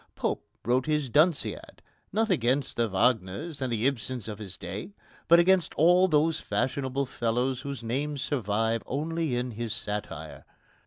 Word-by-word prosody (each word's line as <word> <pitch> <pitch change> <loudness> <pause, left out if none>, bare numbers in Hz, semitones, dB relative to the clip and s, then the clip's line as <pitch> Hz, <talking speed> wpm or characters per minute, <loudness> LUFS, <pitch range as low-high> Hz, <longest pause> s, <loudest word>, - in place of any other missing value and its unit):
Pope - - -1 0.2
wrote 125 +3 +2
his 150 -3 0
Dunciad 155 +5 +1 0.3
not 220 +2 +1
against 130 +3 +1
the 115 -1 +1
Wagners 115 - 0
and 130 -2 -1
Ibsens 120 0 -1
of 105 -1 -6
his 95 -3 -8
day, 105 - -7 0.3
but 170 - +8
against 180 0 +3
all 180 +4 +5
those 155 -1 +2
fashionable 135 +1 -1
fellows 125 +1 -1
whose 140 -3 -5
names 140 +4 -2
survive 115 -3 0
only 160 0 -1
in 125 +1 -2
his 115 0 -4
satire. 105 0 -5
130 Hz, 145 wpm, -28 LUFS, 115-150 Hz, 0.3 s, but